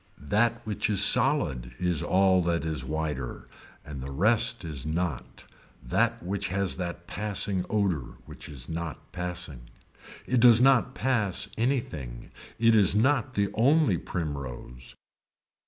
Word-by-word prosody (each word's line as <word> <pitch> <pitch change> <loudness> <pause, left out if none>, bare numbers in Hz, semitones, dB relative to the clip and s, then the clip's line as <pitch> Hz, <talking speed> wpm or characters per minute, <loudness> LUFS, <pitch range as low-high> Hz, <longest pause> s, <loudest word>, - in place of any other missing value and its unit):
That 110 +5 +1
which 110 +1 -2
is 100 -1 +3
solid 70 - +2
is 90 -4 0
all 95 0 +3
that 85 -1 0
is 80 -1 -3
wider 75 -5 -4 0.4
and 70 -3 -7
the 70 +1 -6
rest 100 +4 +1
is 75 -5 -5
not 80 -4 -3 0.4
that 115 - 0
which 95 +2 -2
has 95 0 -1
that 85 -1 -5
passing 100 0 -2
odor 95 - -1
which - - -10
is 65 -4 -8
not 85 -1 -6
passing. 85 -9 -5 0.6
It 125 - +1
does 120 -1 +7
not 130 -1 +4
pass 110 -8 0
anything. 90 - -3 0.3
It 115 0 +4
is 100 -3 +4
not 130 +2 +2
the 100 -1 +1
only 125 - +3
primrose. 65 -6 -6
90 Hz, 135 wpm, -27 LUFS, 75-110 Hz, 0.6 s, does